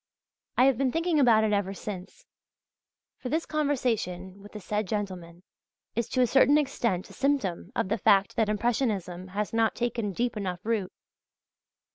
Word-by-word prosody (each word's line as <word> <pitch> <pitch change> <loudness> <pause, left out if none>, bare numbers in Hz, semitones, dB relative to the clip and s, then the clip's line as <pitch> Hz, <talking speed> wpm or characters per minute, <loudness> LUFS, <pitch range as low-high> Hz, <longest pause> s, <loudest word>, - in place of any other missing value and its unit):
I 250 - +6
have 265 -3 +3
been 270 -2 +2
thinking 330 0 +1
about 230 -5 +5
it 215 -1 +1
ever 200 -1 0
since; 205 - -8 0.9
for 250 - -5
this 320 +5 0
conversation 225 - -1
with 205 - -14
the 210 - -6
said 210 +1 -2
gentlemen 180 -4 -5 0.5
is 235 0 -1
to 255 - +1
a - - +6
certain 275 +4 +5
extent 235 -10 -1
a - - -12
symptom 220 -10 -1
of 225 -5 0
the 220 +2 0
fact 200 -1 +3
that 220 -2 +1
Impressionism 210 -5 -1
has 205 +3 -3
not 225 -1 +2
taken 235 -3 -1
deep 240 +5 -1
enough 185 -4 -4
root. 215 -4 -1
215 Hz, 165 wpm, -28 LUFS, 190-250 Hz, 0.9 s, I